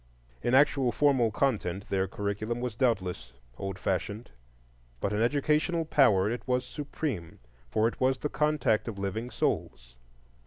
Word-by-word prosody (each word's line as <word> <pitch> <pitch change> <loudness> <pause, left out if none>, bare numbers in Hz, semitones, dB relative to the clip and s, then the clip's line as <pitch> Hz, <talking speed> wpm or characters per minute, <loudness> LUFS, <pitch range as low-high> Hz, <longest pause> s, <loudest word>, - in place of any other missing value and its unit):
In 120 - +2
actual 135 -2 +4
formal 135 -5 +3
content 105 -6 -1
their 95 0 +1
curriculum 105 +4 -3
was 125 -3 -3
doubtless 95 - -1 0.3
old 95 -1 -4
fashioned, 100 - -3 0.7
but 100 - -1
in 105 - 0
educational 150 +6 +1
power 110 -11 +4
it 120 +3 -2
was 125 0 +1
supreme, 140 - -5 0.3
for 110 - +2
it 115 - -5
was 130 0 +3
the 150 - -2
contact 150 -8 +1
of 110 -4 -5
living 100 +5 -3
souls. - - -2
115 Hz, 145 wpm, -29 LUFS, 100-135 Hz, 0.7 s, actual